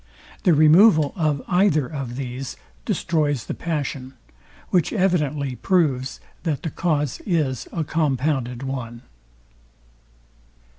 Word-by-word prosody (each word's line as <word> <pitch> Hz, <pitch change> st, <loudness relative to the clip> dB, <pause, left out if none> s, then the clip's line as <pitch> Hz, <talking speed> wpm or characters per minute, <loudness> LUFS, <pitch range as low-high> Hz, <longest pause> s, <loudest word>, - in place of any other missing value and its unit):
The 175 Hz, -, +5 dB
removal 155 Hz, 0 st, +6 dB
of 155 Hz, -5 st, 0 dB
either 180 Hz, -6 st, +3 dB
of 135 Hz, -4 st, -5 dB
these 130 Hz, 0 st, -5 dB, 0.3 s
destroys 150 Hz, -7 st, 0 dB
the -, -, -4 dB
passion; 140 Hz, -5 st, -4 dB, 0.5 s
which 180 Hz, -4 st, +2 dB
evidently 150 Hz, -, 0 dB
proves 140 Hz, -8 st, +1 dB, 0.2 s
that 155 Hz, -5 st, -2 dB
the 160 Hz, -, -3 dB
cause 150 Hz, -5 st, -1 dB
Is 150 Hz, -, -1 dB
a 165 Hz, -, -2 dB
compounded 135 Hz, -5 st, -1 dB
one. 125 Hz, -3 st, -5 dB
145 Hz, 105 wpm, -23 LUFS, 130-165 Hz, 0.5 s, removal